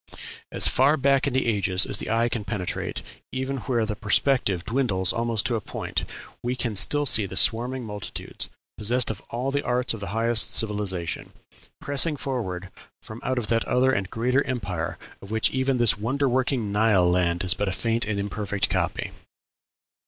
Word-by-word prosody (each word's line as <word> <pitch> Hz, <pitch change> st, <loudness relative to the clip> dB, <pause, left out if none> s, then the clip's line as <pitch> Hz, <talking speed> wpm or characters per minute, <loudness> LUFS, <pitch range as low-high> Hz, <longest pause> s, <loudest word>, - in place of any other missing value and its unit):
As -, -, +5 dB
far 140 Hz, +4 st, +3 dB
back 135 Hz, 0 st, +2 dB
in 140 Hz, -, -1 dB
the 130 Hz, -, +1 dB
ages 100 Hz, -4 st, +3 dB
as 100 Hz, -, +1 dB
the -, -, -4 dB
eye 115 Hz, +1 st, +2 dB
can 115 Hz, -2 st, -3 dB
penetrate, 100 Hz, -4 st, -3 dB, 0.3 s
even 130 Hz, +1 st, -3 dB
where 120 Hz, -2 st, -1 dB
the 105 Hz, -1 st, -3 dB
perspective 105 Hz, -3 st, +1 dB
dwindles 110 Hz, -7 st, +1 dB
almost 115 Hz, -2 st, 0 dB
to 120 Hz, -, +1 dB
a 110 Hz, -, -2 dB
point, -, -, -4 dB, 0.4 s
we 125 Hz, +1 st, -2 dB
can 120 Hz, -4 st, -2 dB
still 145 Hz, +9 st, +3 dB
see 110 Hz, -6 st, +4 dB
the -, -, -6 dB
swarming 125 Hz, +2 st, +3 dB
multitudes, 105 Hz, -2 st, -6 dB, 0.3 s
possessed 120 Hz, +3 st, +2 dB
of 105 Hz, -, -8 dB
all 125 Hz, +3 st, -2 dB
the 140 Hz, +1 st, 0 dB
arts 125 Hz, -2 st, 0 dB
of 115 Hz, -, -6 dB
the 100 Hz, -, -6 dB
highest 115 Hz, +1 st, +1 dB
civilization, 100 Hz, -6 st, -1 dB, 0.5 s
pressing 150 Hz, +1 st, +2 dB
forward 95 Hz, -9 st, -4 dB, 0.3 s
from 110 Hz, +2 st, -10 dB
out 130 Hz, -, -1 dB
that 115 Hz, -1 st, +2 dB
other 130 Hz, +1 st, +2 dB
and 95 Hz, -7 st, -1 dB
greater 125 Hz, +4 st, +1 dB
empire 95 Hz, -10 st, -3 dB, 0.2 s
of 100 Hz, -, -11 dB
which 110 Hz, 0 st, +2 dB
even 130 Hz, 0 st, 0 dB
this 120 Hz, -3 st, +6 dB
wonderworking 130 Hz, -1 st, 0 dB
Nile 105 Hz, -3 st, +3 dB
land 90 Hz, -1 st, +1 dB
is 90 Hz, -2 st, +4 dB
but 105 Hz, -, -2 dB
a -, -, -2 dB
faint 115 Hz, +4 st, -1 dB
and 105 Hz, -1 st, -2 dB
imperfect 100 Hz, 0 st, -2 dB
copy. -, -, -1 dB
115 Hz, 175 wpm, -25 LUFS, 100-130 Hz, 0.5 s, this